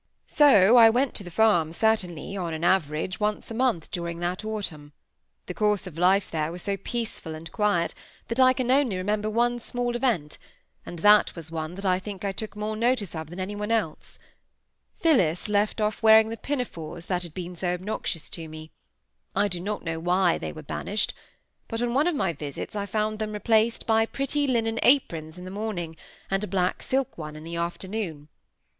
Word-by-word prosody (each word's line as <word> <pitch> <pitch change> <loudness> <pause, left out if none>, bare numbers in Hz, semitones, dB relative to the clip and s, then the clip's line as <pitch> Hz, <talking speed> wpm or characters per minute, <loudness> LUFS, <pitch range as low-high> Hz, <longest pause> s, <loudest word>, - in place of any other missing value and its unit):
So 245 -6 +6
I 225 -1 +9
went 250 +3 +1
to 205 - -3
the 175 - -8
farm 175 -5 +3
certainly, 195 -3 0
on 170 -4 -3
an 160 - -5
average, 175 0 +1
once 210 +1 -1
a - - -3
month 230 -9 0
during 170 -1 -3
that 175 +3 -3
autumn; 175 -9 -5 0.5
the - - -5
course 210 -2 +1
of 180 -5 -9
life 185 +3 +3
there 155 -1 -1
was 175 +1 -7
so 200 - -1
peaceful 195 -5 -4
and 160 +1 -9
quiet, 205 -6 +1 0.3
that 230 +2 -3
I 255 0 +7
can 255 -1 -1
only 260 -8 +3
remember 210 +3 -1
one 240 +2 +1
small 245 +1 -2
event, 225 - -1 0.5
and 175 - -7
that 210 +5 +5
was 165 -2 -9
one 160 +1 -4
that 195 +1 -6
I 185 -1 +3
think 200 0 -7
I 200 - 0
took 215 +2 -6
more 210 +1 -3
notice 230 -4 0
of 160 -2 -6
than 175 +3 -8
any 190 +2 -3
one 210 +1 -4
else: 220 -9 -2 0.8
Phillis 185 - +3
left 210 +1 +1
off 210 0 -1
wearing 220 0 +7
the 225 - -3
pinafores 175 - -4
that 180 -1 -1
had 175 - -7
always 180 0 -5
been 180 +1 -8
so 180 +1 -1
obnoxious 180 -3 -4
to 165 -2 -5
me; 155 0 -10 0.6
I 205 +1 +3
do 180 -3 -3
not 205 +4 -4
know 165 -1 -3
why 180 +1 +2
they - - -4
were 155 - -10
banished, 205 +8 -2 0.5
but 225 - -4
on 240 0 0
one 285 +6 +3
of 350 - +1
my 190 -10 0
visits 145 +5 -6
I 200 -1 -2
found 215 +1 -1
them 215 -1 -3
replaced 220 +2 +2
by 225 0 +3
pretty 280 +3 -1
linen 225 -3 0
aprons 165 - +2
in 180 - -9
the 185 - -7
morning, 195 -6 -4 0.4
and 195 +1 +1
a - - -2
black 180 -1 0
silk 265 -7 -1
one 150 -1 -6
in 155 - -9
the 170 +1 -5
afternoon. 170 -3 -4
200 Hz, 200 wpm, -26 LUFS, 170-225 Hz, 0.8 s, I